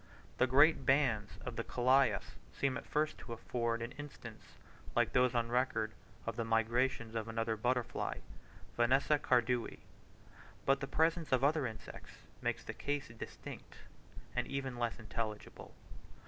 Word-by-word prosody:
The 130 - +5
great 140 +3 +6
bands 125 -6 +2
of - - -4
the - - -1
Colias 130 +2 +2 0.2
seem 135 -2 0
at - - -6
first 155 +1 0
to 120 - -7
afford 115 0 -2
an 120 - -5
instance 120 -6 -10 0.4
like 120 -2 +2
those 125 0 +4
on 115 -1 +1
record 120 -3 +1 0.3
of 115 - -2
the 115 - 0
migrations 115 +1 +1
of 115 -1 -2
another 115 0 -1
butterfly, 125 +2 -1 0.5
Vanessa 135 +5 +3
cardui; 120 -2 +1 0.9
but 135 0 +4
the 135 - -3
presence 165 +2 +1
of 130 0 +3
other 145 -1 +3
insects 110 -1 -9 0.3
makes - - -1
the - - -5
case 145 -2 -3
distinct, 115 -1 -9 0.6
and 125 -1 0
even 135 -2 -3
less 120 -1 -1
intelligible. 110 -1 -5
125 Hz, 145 wpm, -35 LUFS, 115-135 Hz, 0.9 s, great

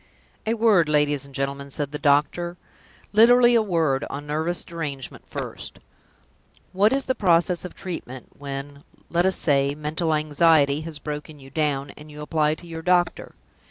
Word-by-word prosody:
"A 225 - +1
word, 210 -8 +4
ladies 145 -2 +1
and 140 - -14
gentlemen," 140 0 -3
said 140 0 -3
the 150 - -5
doctor; 150 +5 +1 0.6
"literally 240 +3 +6
a 230 - +5
word, 165 -9 0
on 145 +1 -6
nervous 160 +4 -2
derangement 145 -6 -6
first. - - -6 1.0
What 200 +4 +4
is 275 0 0
the 260 - +1
process 175 -4 +2
of 180 - -8
treatment, 130 -9 -7
when, 140 0 -7 0.3
let 175 +2 +2
us 190 - +3
say, 140 -1 +2
mental 155 +2 -1
anxiety 150 -1 +3
has 160 -1 -6
broken 150 0 -7
you 135 0 -14
down, 145 -3 -1
and 150 +1 -14
you 150 0 -10
apply 150 0 +1
to 175 - -14
your 165 -1 -7
doctor? 175 0 0
155 Hz, 160 wpm, -24 LUFS, 145-175 Hz, 1.0 s, literally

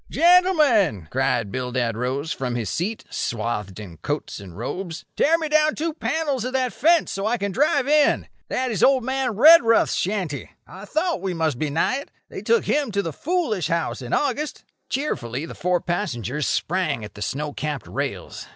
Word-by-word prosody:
"Gentlemen," 305 - +4
cried 105 -4 0
Bildad 125 -3 -1
Rose 130 +6 -2
from 125 -2 -3
his 115 -3 -2
seat, 210 +6 -2
swathed 105 -4 -3
in 90 -6 -9
coats 145 - -4
and 95 -3 -11
robes, 165 - -5
"tear 325 +3 +4
me 320 -1 -3
down 305 0 +3
two 320 +1 -2
panels 300 -6 -1
of 255 +1 -4
that 255 -2 0
fence, 330 +4 +3
so 195 +2 -2
I 240 +2 +1
can 200 -2 -2
drive 275 +3 +2
in. 300 0 +3 0.2
That 255 -1 -1
is 210 - -2
old 265 -2 +5
man 260 -2 -1
Redruth's 255 -2 +6
shanty. 180 -8 -2 0.2
I 185 +7 -11
thought 315 - -1
we 190 -2 -2
must 160 -6 0
be 155 - -1
nigh 165 - +1
it. 280 - -8 0.2
They - - -7
took 465 -1 +2
him 285 -5 +1
to 200 0 +1
the 165 - -4
foolish 260 - -1
house 170 -4 -1
in 125 0 -7
August." 290 +1 -1 0.3
Cheerfully 140 - -2
the - - -8
four 180 0 0
passengers 150 - -2
sprang 175 - -1
at 105 - -11
the 105 - -11
snow 145 +6 -3
capped 150 -3 -4
rails. - - -5
190 Hz, 185 wpm, -23 LUFS, -, 0.3 s, Redruth's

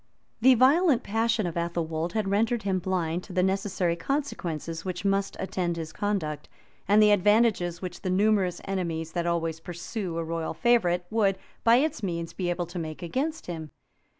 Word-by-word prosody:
The 260 +2 +7
violent 275 +3 +4
passion 225 0 +1
of 170 - -2
Athelwold 170 -1 -2
had 215 -3 0
rendered 220 +3 +1
him 190 -2 0
blind 180 -2 -1
to 190 - -10
the 180 0 +2
necessary 190 -2 0
consequences 170 - -3
which 185 0 -4
must 195 0 0
attend 175 -3 -2
his 160 -1 -5
conduct, 160 -8 -2 0.4
and 205 +2 +5
the 210 - +6
advantages 205 -3 +3
which 180 -1 -6
the 185 - -2
numerous 195 -1 +2
enemies, 170 -4 -2
that 175 0 -2
always 165 -1 -1
pursue 175 +2 -5
a 165 - -1
royal 165 0 -3
favorite, 180 -8 +2
would, 200 -4 +2 0.3
by 230 0 +6
its 300 +3 +1
means, 170 -4 -3
be 180 -2 -2
able 175 0 -1
to 175 +1 -6
make 155 0 -6
against 280 - -2
him. 160 -3 -6
185 Hz, 175 wpm, -27 LUFS, 170-210 Hz, 0.4 s, The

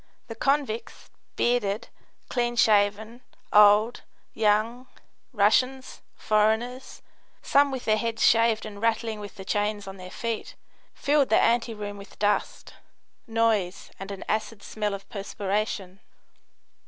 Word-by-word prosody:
The - - -4
convicts, 275 -5 -2 0.2
bearded, 230 -2 0 0.4
clean 240 -1 -1
shaven, 215 +1 +2 0.3
old, 210 +3 +5 0.3
young, 225 +4 +1 0.4
Russians, 255 +4 +1
foreigners, 220 +5 0 0.4
some 285 0 +4
with 265 -2 -5
their 215 -1 +3
heads 230 0 0
shaved 230 -1 +3
and 205 -1 -9
rattling 225 -1 0
with 205 -1 -9
the 190 - -10
chains 205 0 -1
on 195 0 -8
their 185 0 -9
feet, 230 +3 -5 0.4
filled 285 -3 +2
the 220 - +4
anteroom 220 -3 0
with 200 - -14
dust, 210 0 -1 0.5
noise 225 -5 0
and 195 +1 -7
an 200 -1 -7
acid 215 0 -2
smell 210 -2 -3
of 195 0 -12
perspiration. 200 -1 -3
215 Hz, 120 wpm, -26 LUFS, 205-235 Hz, 0.5 s, old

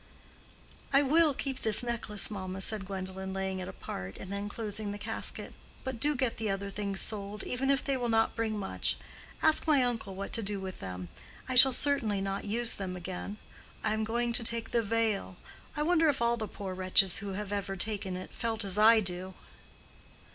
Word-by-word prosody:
"I 275 +1 +5
will 305 +1 +4
keep 265 -1 -3
this 220 +1 +5
necklace, 225 -4 0
mamma," 190 -2 -5
said 200 -1 -1
Gwendolen, 190 0 -5
laying 190 0 -2
it 185 - -5
apart 95 - -6
and 195 - -7
then 200 +1 -3
closing 215 -1 -2
the 205 - -4
casket. - - -3 0.3
"But 260 -3 -4
do 295 +4 +4
get 255 -2 0
the 220 -1 -2
other 200 0 -2
things 200 -1 -2
sold, 205 -1 +1
even 265 +2 -1
if 275 0 +3
they 275 - 0
will 245 -2 -1
not 225 0 +2
bring 220 -2 -1
much. 195 -2 -1 0.5
Ask 315 +1 +4
my 290 -4 +5
uncle 225 -6 -2
what 200 +1 -5
to 230 - +2
do 205 -1 -2
with 190 -1 -6
them. 90 -1 -6 0.4
I 260 - -2
shall 260 +1 +9
certainly 245 -6 +1
not 195 0 -3
use 230 +3 +1
them 185 -2 -4
again. 185 +3 -6 0.5
I 215 - +1
am 220 0 0
going 235 +2 0
to 235 - +1
take 230 0 0
the 235 - +3
veil. 220 -4 0 0.4
I 300 - +1
wonder 325 -1 +4
if 280 - +1
all 235 0 +3
the 220 -2 -4
poor 195 -3 -6
wretches 185 0 +3
who 200 -1 -5
have 205 +1 -4
ever 195 -1 -2
taken 195 -1 -2
it 185 - -8
felt 225 -2 -2
as 195 +1 -2
I 220 +1 +7
do." 185 0 -4
210 Hz, 200 wpm, -31 LUFS, 195-235 Hz, 0.5 s, shall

